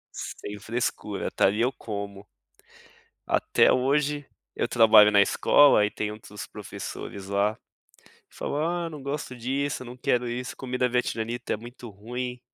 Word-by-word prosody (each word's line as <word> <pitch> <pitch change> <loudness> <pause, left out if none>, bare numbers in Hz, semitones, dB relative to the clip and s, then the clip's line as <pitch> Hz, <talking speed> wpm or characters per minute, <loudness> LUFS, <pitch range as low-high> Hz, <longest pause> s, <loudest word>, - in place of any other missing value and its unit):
Sem 105 0 -6
frescura, 115 +4 -3
tá. - - +3
E 105 +3 -2
eu 125 +3 +2
como. 100 -4 -7 1.0
Até - - +3
hoje, 145 +2 +1 0.3
eu - - +1
trabalho 110 -3 +7
na 100 -1 +5
escola 120 +2 +5
e 105 - -3
tem 105 - -3
outros 105 -1 -9
professores 100 -1 -8
lá, 100 +2 +1 0.7
que - - -21
falam: 170 +4 -1
"ah, 165 - -6
não 150 -3 -9
gosto 140 -2 -4
disso, 135 +4 -2
eu - - -10
não 125 +1 -9
quero 125 -1 0
isso, 125 +1 -4
comida 125 -1 -1
vietnamita 120 -1 -2
é - - 0
muito 120 +2 -10
ruim. 125 +4 -6
120 Hz, 155 wpm, -26 LUFS, 105-130 Hz, 1.0 s, trabalho